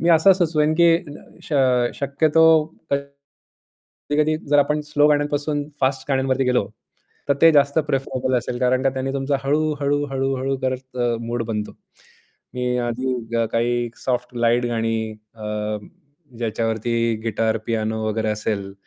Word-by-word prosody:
मी 170 - +1
असं 165 +4 +6
सुचवेन, 155 -4 +1
की 170 +1 +5 0.2
ल 145 - -9 0.3
श - - -7 0.5
शक्यतो 150 +3 +2 0.5
कधी-कधी 140 +2 -4
जर 145 - +4
आपण 150 +1 +2
स्लो 145 0 +4
गाण्यांपासून 145 0 0
फास्ट 135 +1 0
गाण्यांवरती 135 0 +1
गेलो, 125 -5 +1 0.6
तर 140 - +4
ते 165 - +9
जास्त 140 +1 +3
प्रिफरेबल 130 -2 -1
असेल 120 +1 -5
कारण 130 0 +2
का 135 - +3
त्यांनी 135 0 -2
तुमचं 140 +1 0
हळू-हळू, 145 0 +1
हळू-हळू 135 0 -1
करत 130 0 -3 0.2
मूड 120 0 -3
बनतो. 105 -2 -3 0.8
मी 125 0 -1
आधी 120 -1 -1
काही 120 +1 0 0.2
सॉफ्ट 125 -1 -2
लाईट 120 +1 +2
गाणी 115 -1 -1 0.4
अं, 105 -1 -4 0.5
ज्याच्यावरती 115 0 -1
गिटार, 115 0 0
पियानो 110 -1 -1
वगैरे 110 0 -1
असेल. 105 -2 -2
130 Hz, 130 wpm, -22 LUFS, 115-145 Hz, 0.8 s, ते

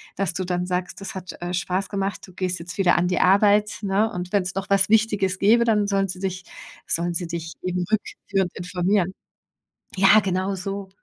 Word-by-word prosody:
dass 195 -3 -1
du 185 0 -2
dann 180 0 -2
sagst, 180 +2 -3
das 195 - -6
hat, 185 -1 -7
äh, 175 +1 -3
Spaß 185 +2 -2
gemacht, 195 0 -2
du 185 - -15
gehst 185 0 -2
jetzt 180 +2 -8
wieder 195 -3 +4
an 175 - +1
die 180 - 0
Arbeit, 205 +2 +4
ne? 205 +3 +1
Und 180 -1 -5
wenn's 190 -2 +1
noch 195 +1 -4
was 195 0 +3
Wichtiges 205 -4 +2
gäbe, 225 +4 +5
dann 210 -3 +2
sollen 195 -1 +1
sie 185 - -6
dich 185 -1 -3 0.4
sollen 175 +1 0
sie 175 - -1
dich 170 0 -5
eben 180 0 -1
rückführend 195 -3 -1
informieren. 180 +1 0 0.8
Ja, 195 +3 +6
genau 190 0 -1
so. 195 +1 -5
190 Hz, 195 wpm, -23 LUFS, 180-200 Hz, 0.8 s, Ja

